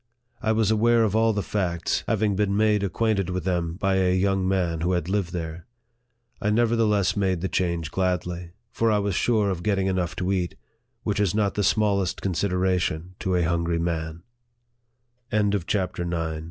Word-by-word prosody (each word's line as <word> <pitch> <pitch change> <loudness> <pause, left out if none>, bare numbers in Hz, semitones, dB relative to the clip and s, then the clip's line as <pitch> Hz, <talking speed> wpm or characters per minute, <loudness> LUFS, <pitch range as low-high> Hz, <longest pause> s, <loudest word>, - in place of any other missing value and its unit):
I 110 - +1
was 110 -1 +2
aware 115 +1 +4
of 110 -1 0
all 115 0 +4
the 105 -2 -1
facts, 85 -5 -1
having 105 -2 +1
been 100 0 +1
made 105 -1 +3
acquainted 100 0 0
with 90 -1 -2
them 85 -2 -1
by 95 0 +1
a 90 -1 +2
young 95 0 +1
man 90 -4 0
who 90 +2 +1
had 90 -2 -1
lived 95 -3 -1
there. 85 -1 -5 0.7
I 105 - +1
nevertheless 110 -3 +2
made 95 -4 0
the 95 - 0
change 85 -4 -1
gladly; 90 -2 -2 0.2
for 115 0 +1
I 105 - +3
was 100 -1 0
sure 105 0 +2
of 90 -2 -4
getting 95 0 +1
enough 90 -2 -1
to 95 0 -1
eat, 90 -3 -1 0.5
which 105 -2 -1
is 100 -2 +1
not 105 -2 +1
the 105 - -1
smallest 100 -2 +1
consideration 90 -2 -1
to 95 -1 0
a 90 - +2
hungry 85 0 0
man. 80 -1 -3 1.1
58 105 - +2
NARRATIVE 100 0 +1
OF 100 - +1
THE - - -15
CHAPTER 90 -3 -1 0.2
X. 80 - -5
95 Hz, 190 wpm, -25 LUFS, 85-105 Hz, 1.1 s, aware